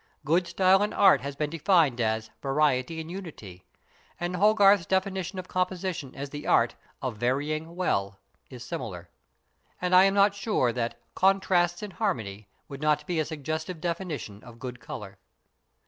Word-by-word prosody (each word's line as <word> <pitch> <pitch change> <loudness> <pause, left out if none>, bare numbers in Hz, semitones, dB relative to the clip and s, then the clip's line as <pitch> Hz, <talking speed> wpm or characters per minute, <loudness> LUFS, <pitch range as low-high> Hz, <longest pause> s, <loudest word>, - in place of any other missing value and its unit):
Good 170 +3 +2
style 185 +2 +4
in 210 - 0
art 195 -1 +5
has 140 0 -5
been 150 +1 -2
defined 165 -6 +3
as 110 0 -1
"variety 140 +1 +1
in 160 - -6
unity," 130 - -9 0.5
and 175 +1 -2
Hogarth's 200 -2 +5
definition 190 -1 -1
of 185 - -5
composition 180 -6 -2
as 140 0 -6
the 145 0 -7
art 115 0 +4 0.3
of 125 -5 -3
"varying 150 +7 -1
well" 100 - -1 0.3
is 125 -2 -9
similar. 90 -7 -6 0.7
And 180 0 -1
I 185 +1 +8
am 195 0 +2
not 200 0 +5
sure 200 - 0
that 120 -1 -3
"contrasts 185 -2 +2
in 210 - -5
harmony" 110 - -3 0.2
would 140 0 -9
not 150 -1 +1
be 175 -3 -1
a 155 - +1
suggestive 160 +3 -4
definition 165 - -4
of 120 -2 -13
good 125 0 -7
colour. 105 -4 -9
160 Hz, 160 wpm, -27 LUFS, 125-185 Hz, 0.7 s, I